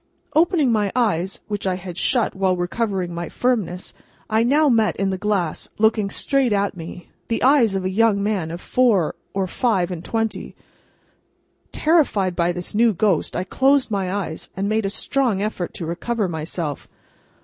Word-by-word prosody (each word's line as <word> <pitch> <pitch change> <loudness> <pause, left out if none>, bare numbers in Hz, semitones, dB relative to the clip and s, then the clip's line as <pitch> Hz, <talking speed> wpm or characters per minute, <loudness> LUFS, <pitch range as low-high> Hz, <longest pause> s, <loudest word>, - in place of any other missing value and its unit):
Opening 320 -5 +3
my 210 -3 +1
eyes, 195 -7 0
which 205 -2 -3
I 185 - +1
had 180 -1 -7
shut 235 +6 +1
while 190 -1 +1
recovering 185 0 -2
my 170 0 -4
firmness, 210 -8 -1 0.4
I 220 +1 +3
now 290 +6 +3
met 225 -5 +3
in 195 -1 0
the 190 - -2
glass, 195 -6 -1
looking 220 -2 +2
straight 270 +3 +1
at 200 -1 0
me, 170 +1 -9 0.2
the 230 - -1
eyes 250 -6 +4
of 190 -1 -2
a - - +1
young 210 0 +2
man 200 -6 -1
of 170 +2 -6
four 225 -10 +2 0.2
or 195 -1 +1
five 190 -3 0
and 175 -2 -5
twenty. 225 -1 -3 1.2
Terrified 265 - +2
by 170 0 +1
this 175 0 -6
new 225 +1 +4
ghost, 190 -3 +1
I 180 - -1
closed 265 +5 +2
my 195 -3 -1
eyes, 190 -5 -4
and 195 +1 -1
made 215 -1 +1
a - - -1
strong 245 0 0
effort 200 -4 -3
to 170 - -4
recover 205 +6 -2
myself. 160 -2 -4
200 Hz, 170 wpm, -22 LUFS, 180-230 Hz, 1.2 s, eyes